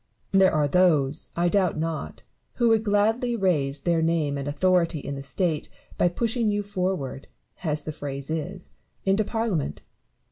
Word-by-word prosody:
There 195 -1 +5
are 150 -1 +2
those, 150 -3 +2
I 175 +1 +2
doubt 185 -2 +2
not, 160 0 -4 0.3
who 240 -2 +2
would 220 -1 +3
gladly 220 +4 +2
raise 150 -9 +1
their 170 -2 +1
name 160 -3 +1
and 140 0 -4
authority 170 +2 +2
in 140 -1 -5
the 135 - -5
State 155 +2 -1 0.3
by - - +3
pushing 230 +5 0
you 205 0 0
forward, 180 -9 -3 0.4
as 150 -3 -1
the 155 - -4
phrase 140 -1 -5
is, 160 -2 -4 0.3
into 195 +2 +3
Parliament. 210 - -2
170 Hz, 155 wpm, -25 LUFS, 150-200 Hz, 0.4 s, There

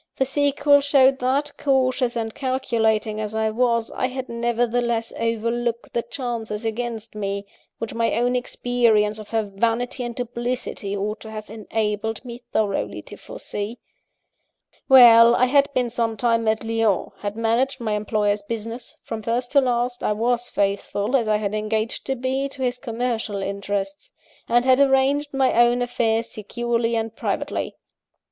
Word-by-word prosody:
The 265 - +1
sequel 285 +1 +3
showed 270 -1 +4
that, 270 +4 0
cautious 255 -2 +1
and 225 -1 -3
calculating 225 -5 0
as 215 0 -4
I 220 0 +1
was, 230 0 +1
I 255 - -1
had 260 0 -6
nevertheless 235 0 0
overlooked 230 +1 -1
the 235 - +1
chances 235 -3 -4
against 225 0 -4
me, 200 -1 -3 0.3
which 230 - -5
my 230 0 0
own 245 +2 +1
experience 235 -4 +1
of 215 - -10
her 225 -1 0
vanity 230 +5 -1
and 240 -1 -5
duplicity 240 -4 -3
ought 210 +2 -3
to 220 - -10
have 215 -1 -8
enabled 220 +1 -3
me 240 -1 -7
thoroughly 205 -3 -1
to - - -11
foresee. 210 +4 -6 1.1
"Well: 235 -2 +9
I 255 - +4
had 280 +2 +3
been 245 -2 +1
some 230 -2 -1
time 230 0 +1
at 220 +1 +1
Lyons; 225 -3 0
had 205 0 -4
managed 235 +4 +1
my 225 -3 -2
employer's 210 -1 0
business 230 +3 -6
(from 225 -1 -5
first 240 +3 -2
to 280 - +5
last, 245 -1 -1
I - - +2
was 240 +2 0
faithful, 200 +3 -1
as 235 -4 +2
I 215 0 +3
had 210 -1 -3
engaged 215 +2 -2
to 270 - 0
be, 265 +2 -1
to 270 -1 -6
his 250 0 -1
commercial 230 -5 -2
interests); 200 - -3 0.4
and 240 +1 +3
had 260 0 +5
arranged 280 +1 +3
my 270 -1 +2
own 240 +1 +4
affairs 230 -2 0
securely 235 +2 -2
and 225 0 -2
privately. - - -3
235 Hz, 155 wpm, -23 LUFS, 220-250 Hz, 1.1 s, Well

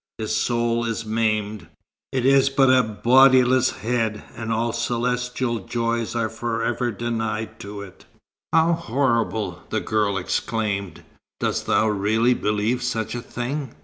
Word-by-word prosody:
His 110 -1 -2
soul 120 0 0
is 115 -1 -3
maimed. 110 -1 -1 0.4
It 130 -2 -1
is 135 0 +5
but 135 -1 +4
a 130 - +6
bodiless 130 +3 +4
head, 115 -2 -2
and 115 0 -4
all 115 +1 0
celestial 125 0 -1
joys 115 +3 -2
are 115 -1 +1
for 115 +1 -3
ever 120 +1 0
denied 115 -1 -3
to 100 0 -7
it." 95 -2 -14 0.5
"How 165 +1 +4
horrible!" 115 - -1
the - - 0
girl 105 -2 0
exclaimed. 100 -1 -2 0.4
"Dost - - -1
thou 110 - +3
really 110 +4 +2
believe 105 +2 0
such 115 -3 -2
a 120 - -4
thing?" 130 +3 -5
115 Hz, 140 wpm, -23 LUFS, 110-125 Hz, 0.5 s, a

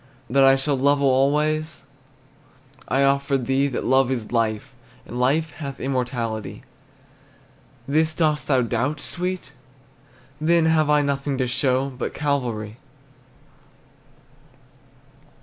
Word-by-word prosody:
That 135 +1 +4
I 135 0 +6
shall 135 0 0
love 140 +2 +3
alway, 145 +3 +2 1.2
I 135 +2 +2
offer 140 0 +2
thee 135 +2 0
That 135 - -3
love 130 0 +3
is 120 -5 -3
life, 115 +2 -1 0.3
And 120 - -6
life 150 +5 +1
hath 140 -3 -7
immortality. 120 -5 -3 1.2
This, 155 +2 +1
dost 155 -3 0
thou 130 -3 +3
doubt, 125 +6 -1
sweet? 180 +3 -4 0.9
Then 165 +1 +3
have 160 -2 +2
I 150 -1 +4
Nothing 140 -1 -2
to 130 - 0
show 130 +2 0
But 125 -1 -5
Calvary. 120 -7 -2
135 Hz, 115 wpm, -23 LUFS, 125-150 Hz, 1.2 s, I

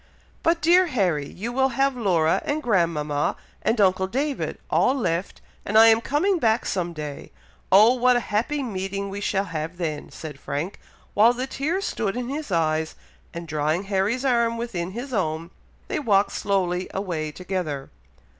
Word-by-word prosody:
"But, 330 -1 +1
dear 355 +3 +5
Harry! 180 - 0
you 230 +6 -5
will 265 +1 +2
have 275 0 +2
Laura 175 -9 +2
and 305 +1 -2
grandmama, 165 - +1 0.3
and 220 +1 0
uncle 190 -1 +3
David, 275 +6 -2
all 260 - +3
left, 180 -7 -2 0.2
and 215 - +1
I 225 +1 +9
am 225 0 +4
coming 345 +9 +1
back 225 -3 +2
some 175 -2 -1
day! 150 -3 -7 0.4
Oh! 215 +6 +7
what 250 0 +3
a - - +3
happy 260 +7 0
meeting 200 -3 -3
we 200 +1 -5
shall 195 -1 0
have 165 0 -5
then!" 155 -4 -3
said 150 -4 -9
Frank, 150 +9 -4 0.3
while 225 +4 +5
the 250 +1 -3
tears 315 +9 -2
stood 215 - -2
in 250 0 -3
his 290 -4 -5
eyes; 160 -2 0 0.4
and 170 0 -7
drawing 155 +3 0
Harry's 200 +6 0
arm 235 -2 +2
within 200 -7 -3
his 250 +4 -6
own, 165 -4 -1 0.4
they - - -2
walked 205 -8 +2
slowly 185 -2 -1
away 170 -6 -2
together. 175 -6 -4
200 Hz, 165 wpm, -24 LUFS, 170-245 Hz, 0.4 s, I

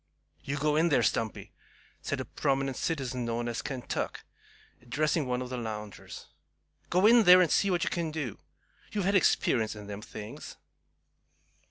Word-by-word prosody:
"You 140 +1 -3
go 150 +1 +1
in 165 +2 +3
there, 145 - +3
Stumpy," 110 -2 -1 0.5
said - - -3
a - - -3
prominent 135 -1 -1
citizen 130 -6 -2
known 120 0 -2
as 120 0 -3
"Kentuck," 130 -4 -4 0.6
addressing 150 +4 0
one 125 0 -1
of 125 - -8
the 125 - -3
loungers. 105 -3 -7 0.6
"Go 185 +3 +3
in 235 +2 +7
there, 180 -3 +8
and 180 -4 +3
see 200 - +3
what 175 -2 +1
you - - 0
kin 170 -2 -1
do. 150 -8 -5 0.5
You've 205 -3 -1
had 200 - +2
experience 120 - +2
in 105 -1 -9
them 100 0 -7
things." 105 -1 -9
135 Hz, 165 wpm, -29 LUFS, 120-165 Hz, 0.6 s, there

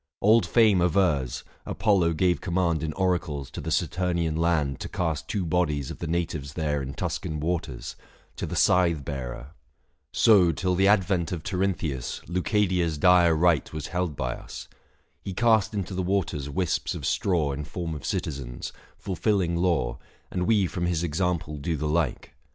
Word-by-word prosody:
710 105 +2 +6
Old 115 - +4
Fame 110 -6 +4
avers, 85 -8 +1 0.2
Apollo 95 -6 +2
gave 90 +2 +1
command 85 -3 0
In 80 -1 -2
oracles 85 -7 -1
to - - -6
the - - -4
Satumian 85 -3 0
land 80 -5 +1
To - - -5
cast 80 -4 -2
two 100 -4 -2
bodies 75 -5 0
of - - -9
the 85 - -4
natives 80 -4 -2
there 75 -3 -1
In 65 0 -6
Tuscan 75 -1 -3
waters, 75 -7 -3 0.4
to - - -4
the - - -4
Scythe 85 -6 +3
bearer. 65 -1 -6 0.6
So 100 -7 +5
till 90 +4 -1
the 95 +2 +3
advent 95 -4 +2
of 85 -4 -4
Tirynthius 85 -9 -2
715 85 - -9
Leucadia's 90 -4 +1
dire 85 0 +5
rite 80 -3 +2
was 80 -2 -4
held 90 -4 -1
by 60 -2 -2
us. - - -9 0.5
He 95 - -6
cast 110 -2 +3
into 95 -2 -3
the 95 - -1
waters 90 -7 -1
wisps 85 +5 -1
of - - -5
straw 85 -7 +1
In 70 +2 -4
form 80 +2 -5
of 75 - -7
citizens, 65 -5 -4 0.2
fulfilling 95 -2 0
law, 85 -9 0 0.3
And 90 -1 -1
we 105 -4 +4
from 85 0 -2
his 85 -1 0
example 85 -2 -1
do 80 +2 -2
the 75 - -2
like. 80 +2 -1
85 Hz, 170 wpm, -26 LUFS, 75-90 Hz, 0.6 s, 710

